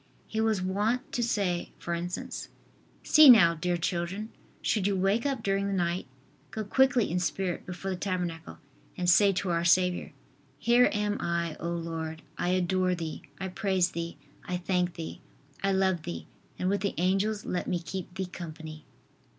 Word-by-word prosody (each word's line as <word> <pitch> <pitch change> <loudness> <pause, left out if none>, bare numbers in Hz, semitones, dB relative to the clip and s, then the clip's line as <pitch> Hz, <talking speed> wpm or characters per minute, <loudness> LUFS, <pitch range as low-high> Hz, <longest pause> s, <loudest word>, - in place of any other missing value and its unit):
He 220 - -1
was 220 -4 +1
wont 210 +6 0
to 245 - -1
say, 200 -7 0
for 170 - -4
instance: 175 +1 -4 0.5
"See 305 -2 +8
now, 195 -9 +8
dear 175 +2 -1
children, 175 +5 -2 0.3
should 200 -3 +1
you 200 - +1
wake 195 +7 +1
up 265 -5 -2
during 195 0 +1
the 200 - -1
night, 175 -1 -1 0.4
go 220 - -4
quickly 260 0 +3
in 180 - +1
spirit 180 0 -2
before 185 +2 -4
the 185 - -2
tabernacle 180 -4 -3 0.4
and 180 - -1
say 200 +3 +6
to 185 -1 -1
our 170 0 +1
Saviour: 180 +1 +3 0.5
"Here 240 +8 +4
am 210 0 0
I, 170 -2 -1
O 170 - -3
Lord, 165 -1 -4
I 175 - -1
adore 185 0 +2
Thee, 165 -2 -5 0.2
I 190 - -3
praise 185 -1 +1
Thee, 170 0 -5 0.3
I 180 - -2
thank 180 -1 0
Thee, 165 -1 -7 0.4
I 195 - +1
love 190 -3 +2
Thee 85 - -6 0.3
and 180 - -1
with 200 0 +1
the 200 - -1
Angels 195 +4 +1
let 180 - -2
me 180 - 0
keep 175 +2 -6
Thee 190 - -2
company."" 160 -3 -8
185 Hz, 175 wpm, -29 LUFS, 170-200 Hz, 0.5 s, See